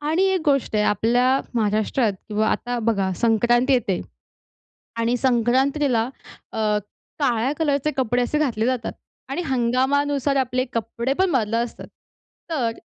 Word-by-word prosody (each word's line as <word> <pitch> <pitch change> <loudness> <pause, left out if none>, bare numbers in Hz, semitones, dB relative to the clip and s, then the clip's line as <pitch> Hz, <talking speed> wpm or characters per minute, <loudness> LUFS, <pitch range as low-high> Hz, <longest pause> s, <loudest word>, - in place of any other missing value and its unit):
आणि 315 +5 +1
एक 375 - +1
गोष्ट 275 -6 +1
आहे, 210 - +2
आपल्या 245 +6 +2
महाराष्ट्रात 215 +1 +1 0.2
किंवा 215 0 +1
आता 245 0 -2
बघा, 200 -5 0
संक्रांती 240 +3 +3
येते. 210 -7 +1 1.0
आणि 230 +1 +1
संक्रांतीला 255 +1 +2 0.5
अ, - - -7 0.6
काळ्या 250 -1 +1
कलरचे 290 -1 +1
कपडे 245 -1 +1
असे 300 +5 0
घातले 235 -7 0
जातात. 250 -2 -1 0.4
आणि 275 +6 -2
हंगामानुसार 270 +3 +1
आपले 255 -1 0
कपडे 235 +3 -2
पण 380 -1 +3
बदलत 225 -5 +1
असतात. 240 - -10 0.6
तर 245 -8 0
245 Hz, 130 wpm, -22 LUFS, 230-275 Hz, 1.0 s, संक्रांती